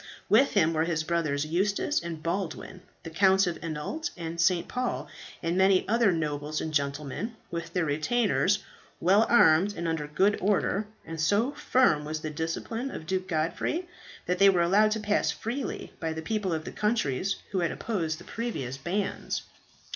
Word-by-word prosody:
With 275 - +5
him 165 -5 +3
were 160 0 +1
his 165 -2 -1
brothers 155 -3 0
Eustace 200 - 0
and 165 -2 -6
Baldwin, 180 +1 -3 0.2
the 165 - -7
Counts 190 +3 +4
of 175 -2 -3
Anault 165 - -3
and 165 0 -3
St. 170 0 +2
Paul, 240 - -2 0.4
and 165 +1 0
many 190 0 +4
other 230 -2 +3
nobles 150 -2 -2
and 160 - -4
gentlemen, 145 - -2 0.2
with 170 0 -4
their 180 -3 +1
retainers, 200 +5 +1 0.4
well 200 +6 +4
armed 195 -2 +5
and 170 - -2
under 160 -2 -2
good 190 +8 +2
order; 205 +1 +1 0.2
and 165 -1 -5
so 205 - +2
firm 245 - +2
was 155 +1 -4
the 155 - -4
discipline 165 - -3
of 160 - -7
Duke 185 +2 -2
Godfrey 170 - -1 0.4
that 180 0 -1
they 200 0 +8
were 180 -3 +3
allowed 205 +5 +4
to 220 - -2
pass 210 0 +1
freely, 245 +4 -4
by 160 -1 -2
the 160 0 -6
people 210 0 -1
of 160 -1 -2
the - - -5
countries 200 - 0 0.2
who 190 - 0
had 170 -2 +1
opposed 165 -8 -2
the 175 - -12
previous 145 - -4
bands. 190 +8 -2
175 Hz, 175 wpm, -28 LUFS, 160-205 Hz, 0.4 s, they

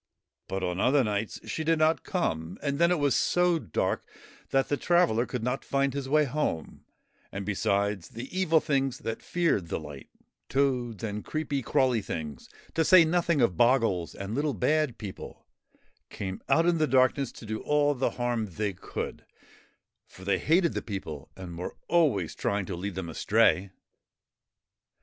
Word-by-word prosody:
But 95 0 -3
on 90 0 -2
other 135 +5 +4
nights 105 -1 -2
she 160 - -3
did 165 +1 +2
not 155 +1 +3
come, 80 - -2
and 140 0 -1
then 170 0 +5
it 180 - +2
was 145 -2 +2
so 175 -1 +2
dark 100 - -2 0.4
that 135 0 +2
the 145 - +1
traveller 145 -8 +2
could 125 -3 -4
not 125 +3 -1
find 140 -1 0
his 140 -1 -4
way; 150 +1 +4 1.1
and, 100 0 -5
besides, 100 -2 0
the 115 +3 -7
Evil 165 -4 +3
Things 135 -4 0
that 115 -3 -5
feared 165 - 0
the - - -2
light 75 -4 -10 0.4
toads 125 -5 0
and 105 -1 -3
creepy, 150 -3 -2
crawly 125 -1 +2
things, 75 -8 -6 0.2
to 165 - +2
say 170 +1 +7
nothing 170 -2 +2
of 115 -7 +3
Bogles 115 - +2
and 100 +2 -5
Little 145 +2 0
Bad 150 -1 +1
People 100 -3 -9 0.6
came 95 -1 -5
out 165 - +4
in 170 -1 +2
the 155 - +3
darkness 130 -1 +3
to - - -11
do 110 0 -3
all 145 0 +2
the 135 -1 0
harm 120 -3 -1
they 100 +2 -3
could, 95 - -6 0.8
for 95 - -14
they 95 -1 +2
hated 170 +2 +3
the - - -2
people 80 -8 -6
and 90 -3 -8
were 90 - -5
always 140 - +2
trying 100 -1 -1
to 90 - -4
lead 95 +2 -5
them 95 -2 -4
astray. 90 +3 +2
125 Hz, 170 wpm, -28 LUFS, 100-150 Hz, 1.1 s, say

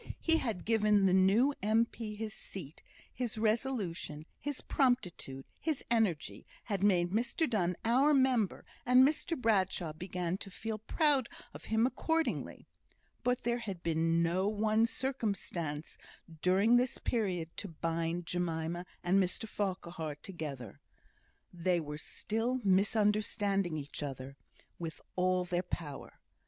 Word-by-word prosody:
He 325 -1 +3
had 225 - -3
given 210 -3 +4
the 185 - +4
new 200 +9 +5
M.P. 220 +1 0
his 215 0 -4
seat; 165 -8 -8 0.3
his 240 -4 -3
resolution, 215 - -1
his 290 -2 -3
promptitude, 180 - 0
his 315 -4 -1
energy, 210 -10 0 0.2
had 200 -4 -2
made 180 -4 +3
Mr 235 - +1
Donne 180 -6 +1
"our 260 +6 +4
member;" 260 -7 +2 0.2
and 250 +2 +7
Mr 315 +1 -1
Bradshaw 190 -7 +1
began 180 +2 -3
to - - -6
feel 220 +3 -5
proud 275 +3 +2 0.2
of - - -10
him 220 +1 +2
accordingly. 320 +5 -1 0.6
But 250 0 +1
there 240 0 0
had 195 -7 -6
been 165 0 +2
no 180 +4 +1
one 215 +2 +2
circumstance 200 - -3 0.4
during 200 +6 +5
this 250 0 +1
period 180 -8 -1
to - - -3
bind 165 +1 -2
Jemima 175 0 -2 0.2
and 185 +3 +4
Mr 185 +4 -1
Farquhar 175 -7 -3
together. 150 - -7 0.7
They 175 0 +1
were 150 -1 -5
still 225 +9 -2
misunderstanding 200 -2 +2
each 145 0 -5
other 135 -1 -5 0.4
with 165 -1 -5 0.2
all 185 0 +2
their 175 0 0
power. 160 -5 -6
195 Hz, 130 wpm, -33 LUFS, 170-230 Hz, 0.7 s, and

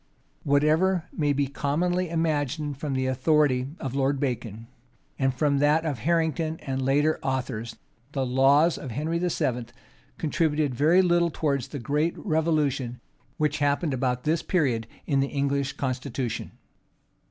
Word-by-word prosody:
Whatever 155 +5 +2
may 150 -3 +1
be 140 0 +1
commonly 170 +6 -1
imagined, 150 -3 -1
from 145 -2 -3
the 130 0 0
authority 130 0 +2
of 130 -2 -4
Lord 140 0 +1
Bacon, 115 -5 -3 0.5
and 135 -1 +2
from 140 +2 +1
that 150 +3 +3
of 145 -6 -2
Harrington, 160 +2 0
and 135 -1 -3
later 145 +4 +2
authors 125 -4 -3 0.4
the 135 -2 0
laws 135 +6 +4
of 135 - -7
Henry 155 +7 -2
VII. 125 -9 -1 0.5
contributed 155 -3 0
very 160 +9 +4
little 175 -1 +3
towards 140 -5 -1
the 145 - -6
great 150 +6 0
revolution 150 - 0 0.4
which 150 0 0
happened 145 +1 +1
about 125 -1 -1
this 155 +1 +1
period 125 - 0 0.2
in 140 -3 +1
the 135 - +2
English 140 -1 -1
constitution. 130 -2 -3
145 Hz, 140 wpm, -26 LUFS, 130-160 Hz, 0.5 s, laws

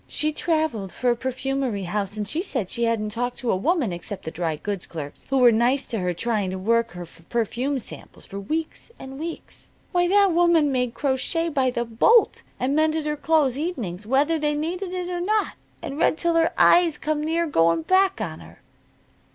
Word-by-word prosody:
She 305 0 -1
traveled 310 - -1
for 250 -1 +1
a - - +1
perfumery 260 -3 -2
house, 200 +3 -3
and 210 -1 -2
she 315 +8 -1
said 255 - -2
she 235 -1 0
hadn't 225 -2 0
talked 245 +2 -3
to 245 - -1
a - - +2
woman, 255 - 0
except 185 +3 -7
the 160 - -4
dry 165 -2 -2
goods 195 +4 -5
clerks 150 -4 -8
who 270 - +2
were 250 -2 +7
nice 240 +5 +2
to 225 - -2
her 180 -1 0
trying 205 +1 -1
to 190 - -4
work 230 +2 +1
her 175 0 -7
for 165 0 -19
her 165 - -26
perfume 240 +4 -1
samples, 250 - -9
for 200 - -7
weeks 315 - -4
an' 265 +1 -9
weeks. 330 +1 -7 0.2
Why, 355 0 +2
that 400 +1 +4
woman 335 -3 +4
made 250 -2 -1
crochet 295 +5 -1
by 270 -4 +1
the 240 -1 -2
bolt, 235 - +3 0.2
and 270 +3 0
mended 315 0 +1
her 300 0 -1
clothes 285 -3 +1
evenings 225 - -4
whether 285 +6 +2
they 295 0 0
needed 350 +5 -3
it 365 -1 -3
or 355 -1 -3
not, 425 +3 0 0.3
and 290 -2 -5
read 315 - +3
till 340 0 +1
her 330 0 +3
eyes 345 -3 +5
come 305 -1 -2
near 330 +2 0
going 165 - +2
back 385 0 +3
on - - -4
her." - - -15
265 Hz, 210 wpm, -24 LUFS, 215-325 Hz, 0.3 s, were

